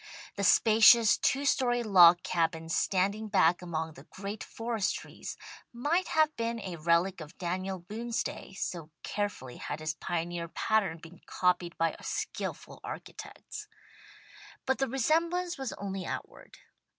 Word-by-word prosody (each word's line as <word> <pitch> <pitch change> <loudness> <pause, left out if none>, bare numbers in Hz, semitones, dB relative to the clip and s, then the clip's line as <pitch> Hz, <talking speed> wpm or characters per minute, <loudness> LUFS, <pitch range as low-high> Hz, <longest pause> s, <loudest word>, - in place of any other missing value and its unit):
The 200 - -3
spacious, 225 +2 +7
two 280 +1 +1
story 245 -3 +2
log 180 -4 +7
cabin 165 -1 -1
standing 195 +6 +1
back 180 -4 +3
among 160 -2 -3
the 135 0 -14
great 200 +4 -7
forest 225 -3 -2
trees, - - -8 0.3
might 300 +10 0
have 310 -1 +2
been 230 0 -2
a 185 -5 -6
relic 170 +3 +1
of 155 +3 -11
Daniel 185 +2 -3
Boone's 225 +6 -3
day, - - -7
so 170 -4 -4
carefully 200 -12 -4
had - - -5
his 155 0 -2
pioneer 170 +1 -3
pattern 200 -1 0
been 165 +1 -14
copied 180 -1 0
by 165 -1 +1
skilful - - -5
architects. 425 0 -8 1.0
But 265 - +1
the 270 - +1
resemblance 335 +7 0
was 265 -3 -3
only 195 -1 -5
outward. - - -7
195 Hz, 140 wpm, -30 LUFS, 170-235 Hz, 1.0 s, spacious